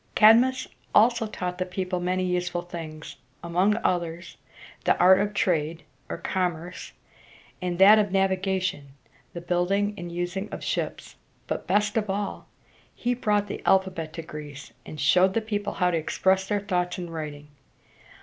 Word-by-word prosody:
Cadmus 245 +4 +5 0.3
also 230 +1 +4
taught 180 -3 -5
the - - +1
people 185 0 -3
many 185 +1 -1
useful 180 -1 -1
things, 160 -3 -8 0.3
among 180 +5 +2
others 170 -1 -2 0.5
the - - +3
art 185 +1 +6
of 205 +1 0
trade 165 -4 0 0.3
(or - - -4
commerce) 180 -1 -3 0.7
and 180 -1 -2
that 205 +3 +8
of 205 -2 0
navigation 190 -5 0 0.4
(the 170 - -6
building 180 +4 0
and 175 0 -6
using 175 +4 -3
of - - -7
ships); - - -3 0.3
but, - - -4
best 210 +3 +1
of 215 -2 -1
all, 200 +1 -3 0.5
he 245 +1 -1
brought 210 -4 +1
the 205 - -6
alphabet 190 -4 +1
to 165 - -6
Greece, 150 -2 -9
and 155 - -8
showed 185 +6 +4
the - - +4
people 205 -2 -3
how 180 0 +1
to 170 - +1
express 190 +4 +1
their 205 0 0
thoughts 180 -3 -1
in 180 -1 -5
writing. 150 -3 -7
185 Hz, 155 wpm, -26 LUFS, 175-205 Hz, 0.7 s, that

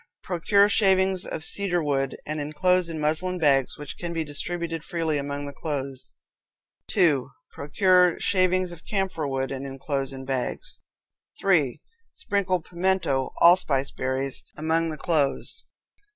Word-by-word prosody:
Procure 200 +3 +3
shavings 190 -3 +3
of 160 - -5
cedar 180 -4 0
wood, 135 -2 -1
and 155 +1 -3
inclose 170 +4 +1
in 160 -1 -4
muslin 160 +5 -1
bags, 140 -5 +2
which 145 -1 -8
can 170 -1 -4
be 165 -1 -1
distributed 165 +2 -2
freely 165 -4 -1
among 140 0 -4
the 140 - -7
clothes. 140 -3 -5 0.7
2. 145 -7 +2 0.2
Procure 180 +4 +3
shavings 185 -1 +2
of 170 -2 -10
camphor 190 -7 -2
wood, 135 -1 -2
and 135 0 -4
inclose 135 0 -3
in 135 0 -8
bags. 130 -2 -3 0.6
3. 160 -10 +2 0.3
Sprinkle 195 - -1
pimento 170 -7 0
(allspice) 155 -6 +4
berries 130 +1 -3
among 160 +2 0
the 155 - -5
clothes. 150 -6 -1
160 Hz, 135 wpm, -25 LUFS, 140-180 Hz, 0.7 s, allspice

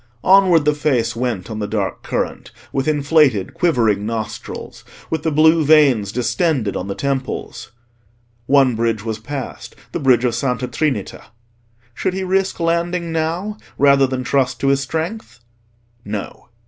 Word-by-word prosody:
Onward 185 -5 +5
the 150 - +3
face 145 -7 0
went 115 -5 -3
on 110 - -4
the 105 - -2
dark 100 -2 -2
current, - - -3 0.2
with 135 +1 -1
inflated 145 - +2
quivering 115 - +1
nostrils, 110 0 -6 0.3
with 160 -2 -1
the 160 - 0
blue 160 +2 +4
veins 140 -10 +4
distended 120 - 0
on 90 - -4
the 100 - -4
temples. 135 -3 -4 0.8
One 135 -3 +4
bridge 115 -2 -1
was 110 -2 -3
passed—the 140 -3 -7
bridge 130 -3 +3
of 120 - +1
Santa 125 0 -1
Trinita. 135 -11 -2 0.7
Should 185 - -2
he 190 - -2
risk 190 0 0
landing 170 +1 -1
now 165 +6 -2 0.2
rather 140 -1 +5
than 130 -1 -3
trust 130 -1 0
to 135 - +2
his 140 0 +3
strength? 160 - -4 0.6
No. 105 +1 -6
135 Hz, 145 wpm, -19 LUFS, 115-160 Hz, 0.8 s, Onward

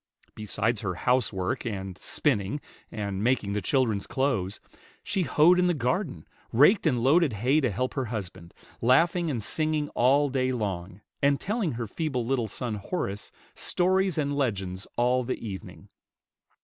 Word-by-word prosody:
Besides 110 +1 -1
her 90 -4 -2
housework, 120 0 0
and 95 -5 -4
spinning, 105 - 0 0.3
and 100 -2 -3
making 115 -5 +1
the 105 - -1
children's 110 -2 +1
clothes, 120 -9 -1 0.4
she 190 - -1
hoed 175 +1 +4
in 180 - +3
the 175 - +2
garden, 130 - -2 0.3
raked 155 - +5
and 125 -6 +1
loaded 150 0 +4
hay 125 +9 +2
to 130 - +1
help 125 +6 -2
her 135 -2 -1
husband, 95 -6 -7 0.3
laughing 165 +8 +3
and 120 -7 -2
singing 155 +2 0
all 140 +4 +3
day 130 -1 0
long, 100 -5 -4 0.2
and 140 0 +3
telling 205 - -1
her 115 0 -3
feeble 130 0 -2
little 120 -2 0
son, 110 +1 -4
Horace, 105 - -4 0.2
stories 185 -1 +1
and 145 -2 0
legends 95 -8 -2
all 125 +1 +2
the 125 - -3
evening. 100 -4 -8
125 Hz, 150 wpm, -27 LUFS, 105-145 Hz, 0.4 s, raked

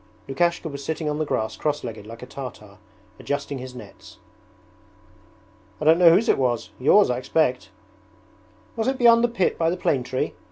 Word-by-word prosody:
Lukashka 170 +5 0
was 140 -2 -7
sitting 160 +1 -3
on 150 0 -2
the 155 - 0
grass 110 -6 -2
crosslegged 120 -8 -4
like 115 +2 -10
a - - -6
Tartar, 105 -7 -10 0.4
adjusting 145 -1 -4
his 130 0 -9
nets. - - -13 1.6
'I 155 - -4
don't 160 +2 +5
know 175 -2 +8
whose 195 +8 +3
it - - +3
was 120 -3 -1
yours, 170 +7 +4
I 125 - -2
expect.' 130 -1 0 1.1
'Was 225 +1 -2
it 265 0 0
beyond 235 -1 +5
the - - +4
pit 230 -6 -1
by 165 -1 +2
the 180 - -2
plane 145 -6 0
tree? 130 +1 -3
145 Hz, 175 wpm, -23 LUFS, 125-170 Hz, 1.6 s, know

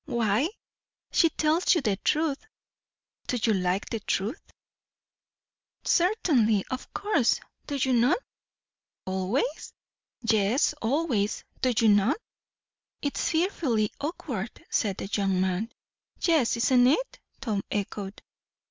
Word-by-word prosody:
"Why?" 235 +5 +1 0.6
"She 330 - +4
tells 315 +4 +2
you 335 - +1
the 210 -7 +1
truth." 305 +2 0 0.9
"Do 250 - 0
you 225 - +4
like 185 0 0
the 225 - -1
truth?" 210 +5 -2 1.4
"Certainly. 285 - +3
Of 255 - -5
course. 330 - +1 0.3
Do 290 - -3 0.2
not 245 +8 +4
you?" - - -16 0.8
"Always?" 190 - -2 0.5
"Yes, 225 +5 +2
always. 235 -5 0 0.2
Do 255 - +3 0.2
not 205 +6 +4
you?" 300 -8 -10
"It's 335 - -2
fearfully 315 - +1
awkward!" 260 - -5
said 200 -3 0
the - - -4
young 195 -2 0
man. 190 +5 0 0.5
"Yes, 310 -9 +2
isn't 245 +1 +4
it?" 415 - +1 0.2
Tom 220 -7 -1
echoed. 200 -1 -4
235 Hz, 110 wpm, -27 LUFS, 205-305 Hz, 1.4 s, She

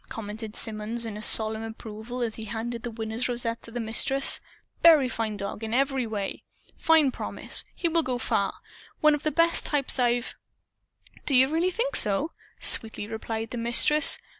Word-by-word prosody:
commented 215 0 -7
Symonds 225 +2 +1
in 210 -1 -7
solemn 220 0 +6
approval 225 +2 -8
as 225 -2 -3
he 220 - -7
handed 230 +2 -6
the 240 - -6
Winner's 225 +2 -4
rosette 235 -1 -4
to - - -15
the 240 +1 -7
Mistress. 240 +4 +1 0.4
"Fine 250 -10 +3
dog 200 +2 -6
in 220 +1 -3
every 270 -2 -1
way. 205 -3 -5 0.3
Fine 315 -4 +2
promise. - - -2
He 345 - -2
will 335 0 +1
go 255 -5 -4
far. 200 -4 -2 0.5
One 305 0 +4
of 295 - -3
the 305 - -2
best 335 +3 +3
types 280 -2 -1
I've 240 0 0 0.5
" - - -29
"Do 275 - +2
you 260 +1 +5
really 330 +4 0
think 470 +7 -3
so?" 210 +11 +4 0.3
sweetly 220 -2 +4
replied 225 +1 -6
the 245 - -5
Mistress. 240 +6 +3
235 Hz, 170 wpm, -25 LUFS, 220-275 Hz, 0.5 s, solemn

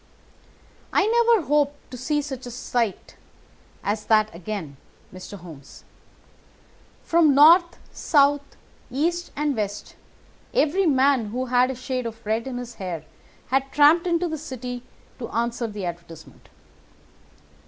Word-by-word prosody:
"I - - +3
never 465 -4 +3
hope 290 0 +2 0.2
to - - -7
see 295 +4 -1
such 265 -3 -7
a - - -5
sight 240 -3 -3 0.7
as 210 +1 -2
that 215 -1 +3
again, 170 -5 -6 0.4
Mr. 185 +2 -9
Holmes. 160 -6 -13 1.2
From 325 -4 +4
north, 340 +5 +6
south, 285 -1 +3 0.5
east, 340 +7 -1
and 295 -1 0
west 205 -2 -4 0.6
every 375 -3 +2
man 270 -4 +3
who 250 +5 -3
had 250 0 +3
a 265 - -3
shade 255 -1 -3
of 225 0 -10
red 220 +3 -1
in 255 -2 -4
his 245 -1 -7
hair 175 -4 -4 0.5
had 270 +1 0
tramped 305 +4 +5
into 345 0 +1
the 315 -2 -4
city 250 -4 -6 0.4
to 235 - -6
answer 235 +1 -1
the 205 -3 -6
advertisement. 170 -2 -9
255 Hz, 130 wpm, -24 LUFS, 215-295 Hz, 1.2 s, north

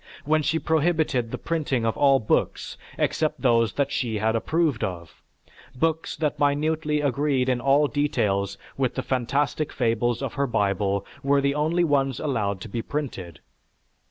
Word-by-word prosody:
When 155 +1 +2
she 160 +2 +1
prohibited 160 -7 +1
the - - -4
printing 145 -8 -1
of 115 - 0
all 135 -1 +4
books 110 - -1 0.2
except 155 -2 -1
those 115 -4 +3
that 140 -1 0
she 115 -6 -1
approved 115 +6 0
of; 85 -3 -6 0.5
books 160 +4 -1
that 150 -2 -2
minutely 150 +1 +1
agreed 140 -1 +1
in 125 -2 +1
all 140 +3 +4
details 100 -10 0 0.2
with 130 -2 0
the 130 - -2
phantastic 135 +4 -1
fables 120 +1 0
of 135 - -3
her 140 -1 0
Bible 100 -3 0 0.2
were 140 +1 +3
the 140 0 +1
only 160 +4 +1
ones 135 -5 +1
allowed 105 -10 -1
to - - -6
be 115 - -3
printed. 110 - -5
135 Hz, 155 wpm, -25 LUFS, 115-150 Hz, 0.5 s, all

